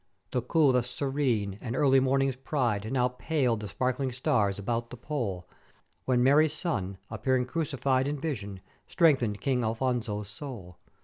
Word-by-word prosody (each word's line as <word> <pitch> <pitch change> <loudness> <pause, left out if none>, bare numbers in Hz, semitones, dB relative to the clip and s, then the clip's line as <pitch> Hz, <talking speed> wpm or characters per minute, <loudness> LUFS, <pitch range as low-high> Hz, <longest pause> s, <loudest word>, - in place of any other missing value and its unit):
"The 125 - 0
coolth 130 -1 +3
serene, 125 -7 -1
and 120 0 -4
early 135 -1 +5
morning's 135 0 +2
pride, 120 -6 -1
now 125 -2 +2
paled 125 -3 0
the 105 - -5
sparkling 130 +6 -1
stars 120 -6 +1
about 115 +3 -2
the 125 - -9
Pole, 115 - -3 0.6
when 125 -1 +3
Mary's 145 +3 +5
Son 100 - -3
appearing 125 +4 +1
crucified 135 -3 0
in 145 +1 -2
vision, 105 - -4 0.3
strengthened 130 - +2
King 130 -3 +1
Afonso's 110 -3 -1
soul. 100 - -9
125 Hz, 140 wpm, -28 LUFS, 110-135 Hz, 0.6 s, early